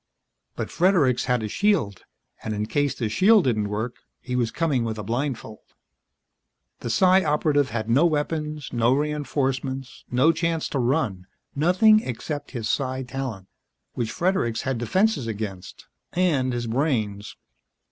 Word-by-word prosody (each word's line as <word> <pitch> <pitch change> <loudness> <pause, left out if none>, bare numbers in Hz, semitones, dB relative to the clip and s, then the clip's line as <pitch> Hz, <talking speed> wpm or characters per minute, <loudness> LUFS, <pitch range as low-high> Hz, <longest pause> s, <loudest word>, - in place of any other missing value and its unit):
But - - -4
Fredericks 165 -9 +3
had 125 -3 +1
a - - -2
shield. 150 - 0 0.4
And 110 -1 -3
in 105 +1 -1
case 145 +5 0
the 115 - -2
shield 195 - +5
didn't 110 -6 0
work, 110 +4 -3 0.2
he 125 - -5
was 120 -2 +1
coming 140 -1 0
with 110 -1 -3
a 105 - -5
blindfold. 120 0 -3 1.2
The 120 - -5
Psi 185 +8 +4
Operative 150 -2 +2
had 110 -1 -3
no 135 +9 +4
weapons, 150 -1 -2
no 120 +1 +3
reinforcements, 135 -3 -2
no 130 +6 +4
chance 165 0 -1
to 140 - -2
run 120 - 0 0.3
nothing 185 +8 +5
except 145 - -5
his 120 -5 -4
psi 130 -1 -1
talent, 125 -7 -5 0.5
which 115 -2 -2
Fredericks 170 - 0
had 130 -3 -2
defenses 185 - +1
against, 105 -4 -6 0.3
and 150 -8 +1
his 120 -1 -2
brains. 110 -5 -1
130 Hz, 145 wpm, -24 LUFS, 115-155 Hz, 1.2 s, shield